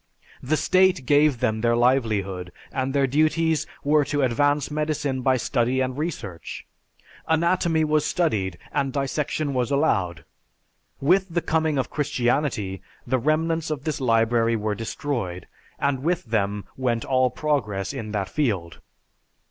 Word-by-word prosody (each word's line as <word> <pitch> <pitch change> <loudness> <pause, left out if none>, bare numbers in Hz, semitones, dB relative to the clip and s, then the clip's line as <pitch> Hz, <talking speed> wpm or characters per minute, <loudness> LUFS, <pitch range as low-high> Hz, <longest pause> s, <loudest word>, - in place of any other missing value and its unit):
The 155 +5 0
state 185 -5 +3
gave 145 -2 +3
them 110 -3 0
their 115 0 +3
livelihood 105 -8 +1 0.2
and 130 0 -1
their 140 0 +2
duties 155 +3 +1 0.2
were 150 +1 +4
to 145 -1 0
advance 145 +4 +1
medicine 150 -3 -1
by 130 0 +3
study 125 +1 0
and 130 -1 -1
research. 125 - -5 0.6
Anatomy 165 0 +2
was 155 -1 +2
studied 100 - 0
and 135 -1 0
dissection 140 +1 -1
was 125 -2 0
allowed. 100 - 0 0.7
With 185 +7 +3
the 170 +1 0
coming 160 -2 +1
of 130 - -1
Christianity, 125 -8 -1 0.2
the 130 - +1
remnants 160 +4 0
of 150 -3 -3
this 155 -3 -3
library 115 -1 +2
were 105 -1 -1
destroyed, 110 -4 -4 0.3
and 140 -2 0
with 170 +1 0
them 105 -3 -1
went 120 -3 -1
all 130 -1 +3
progress 125 -7 -1
in 115 -6 -5
that 100 -3 -1
field. 95 - -2
135 Hz, 140 wpm, -24 LUFS, 115-150 Hz, 0.7 s, were